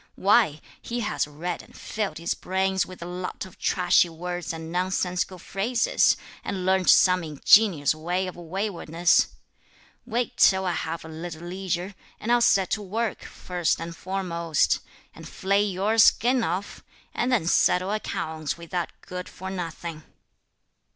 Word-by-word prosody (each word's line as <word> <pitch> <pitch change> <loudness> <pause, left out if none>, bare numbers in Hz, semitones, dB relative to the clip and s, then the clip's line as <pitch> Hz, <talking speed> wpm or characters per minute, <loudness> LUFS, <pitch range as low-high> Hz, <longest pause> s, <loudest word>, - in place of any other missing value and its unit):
why, 195 -6 +3 0.2
he 240 0 -4
has 210 -8 -1
read 165 +4 -4
and - - -17
filled 210 -7 -3
his 170 +1 -1
brains 190 0 0
with 185 -2 -9
a - - -6
lot 180 +2 -5
of 185 - -15
trashy 180 -1 +3
words 175 +1 -5
and 160 0 -7
nonsensical 180 0 -1
phrases, 215 +7 +1 0.3
and 190 -3 -3
learnt 190 -1 +3
some 180 -1 +6
ingenious 155 +1 +4
way 175 +4 -2
of 185 - -6
waywardness. 175 -1 +1 0.8
Wait 240 0 -1
till 190 0 +5
I 180 - +1
have 165 -1 -4
a - - -8
little 160 +1 -7
leisure, 185 +1 -3 0.3
and 230 - -2
I'll 240 0 +4
set 195 -5 +3
to 215 - 0
work, 215 +3 -2
first 175 -2 -2
and 165 0 -6
foremost, 170 -4 0 0.3
and - - -11
flay 200 +1 +1
your 205 +3 0
skin 245 +3 +5
off, 180 +5 -3 0.3
and 245 +2 0
then 225 -10 +2
settle 180 +2 +3
accounts 160 -8 -3
with 170 -1 -12
that 175 -2 -2
good 180 0 -7
for 190 +1 -7
nothing!" 170 -3 -5
180 Hz, 150 wpm, -25 LUFS, 170-195 Hz, 0.8 s, some